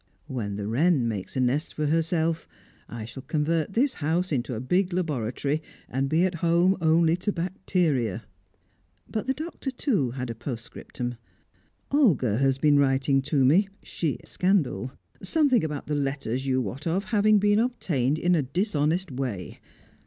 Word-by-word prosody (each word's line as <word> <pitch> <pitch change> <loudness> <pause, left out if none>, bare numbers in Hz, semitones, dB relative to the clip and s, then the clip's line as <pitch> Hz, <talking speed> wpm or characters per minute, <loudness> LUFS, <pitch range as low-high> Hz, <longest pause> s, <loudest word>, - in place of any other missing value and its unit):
When 105 -6 -4
the 100 0 -4
Wren 135 +2 +2
makes 105 -4 -4
a - - +1
nest 130 +5 0
for 155 - -1
herself, 165 +1 0 0.4
I 115 -2 -6
shall 120 +4 -9
convert 160 +5 -1
this 260 +5 +2
house 165 +4 -1
into 125 -3 -1
a - - -3
big 180 +9 +1
laboratory, 145 -3 -1 0.3
and 135 +2 -1
be 165 +4 +3
at 185 - 0
home 170 +2 +4
only 165 +1 +4
to 205 +3 -1
bacteria." 165 - -1 0.8
But 220 +3 -4
the 265 - +1
Doctor, 310 -2 -5
too, 245 - 0
had 125 0 -4
a - - -4
postscriptum. 120 0 -6 0.7
"Olga 155 - +3
has 135 -1 +2
been 145 0 +4
writing 135 0 +2
to 135 -1 +1
me, 185 +9 +4
sheer 160 -5 -2
scandal, 180 -9 0 0.3
something 260 - +2
about 150 -2 -3
the 150 - -3
letters 135 -2 -2
you 130 -1 +1
wot 130 - -5
of 180 +4 0
having 215 -1 +3
been 205 +1 +3
obtained 155 - 0
in 175 +2 +2
a 165 - +3
dishonest 160 - 0
way. 125 -8 -4
150 Hz, 160 wpm, -26 LUFS, 130-180 Hz, 0.8 s, home